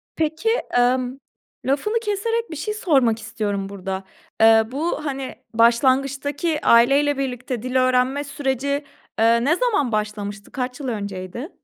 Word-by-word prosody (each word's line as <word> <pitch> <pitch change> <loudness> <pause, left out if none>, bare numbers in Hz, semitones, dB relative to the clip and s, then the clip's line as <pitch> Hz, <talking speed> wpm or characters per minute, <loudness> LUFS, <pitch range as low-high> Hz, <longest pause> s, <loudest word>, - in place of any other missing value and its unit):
Peki, 320 +8 0 0.3
ımm, 255 +1 +1 0.5
lafını 355 - +1
keserek 455 +1 -1
bir 315 - -5
şey 425 +8 -3
sormak 270 - +2
istiyorum 210 -3 -3
burada. 195 -1 -5 0.4
Eee, 225 0 +7
bu, 305 +2 -2
hani, 270 -2 -4 0.2
başlangıçtaki 270 +6 +2
aileyle 275 +5 +5
birlikte 250 -3 -3
dil 255 0 -4
öğrenme 255 +2 +2
süreci, 280 0 -2 0.4
eee, 230 +1 +4
ne 315 +4 +3
zaman 400 - +1
başlamıştı? 210 -1 -3
Kaç 250 0 -4
yıl 270 - -5
önceydi? 200 - -5
260 Hz, 130 wpm, -22 LUFS, 230-290 Hz, 0.5 s, Eee